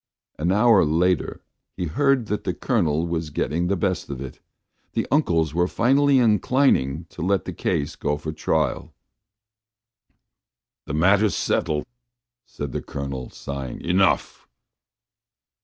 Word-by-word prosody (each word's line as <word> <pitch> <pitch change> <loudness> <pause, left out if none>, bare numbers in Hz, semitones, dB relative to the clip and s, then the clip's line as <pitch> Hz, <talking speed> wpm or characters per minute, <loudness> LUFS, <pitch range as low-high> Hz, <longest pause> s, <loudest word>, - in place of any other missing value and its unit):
An 85 +4 +1
hour 105 +1 +5
later 85 +2 0 0.3
he 90 - -2
heard 135 - +2
that 105 0 -3
the 90 - -2
Colonel 85 - 0
was 85 -2 -3
getting 85 +4 -1
the 100 - +1
best 95 -2 -2
of 70 -2 -5
it; 65 -1 -8 0.5
the - - 0
uncles 85 - +2
were 85 +1 +2
finally 135 +6 +3
inclining 105 - +2
to - - -9
let 95 +2 +1
the - - -5
case 70 - -2
go 75 0 -1
for 80 +1 -5
trial. 75 -2 -1 1.9
"The 70 - -3
matter's 100 +6 +3
settled," 75 -1 0 0.6
said 70 -2 -6
the - - -3
Colonel, 70 -2 -6
sighing. 70 -3 -6
"Enough." 95 +2 +1
85 Hz, 130 wpm, -23 LUFS, 75-105 Hz, 1.9 s, hour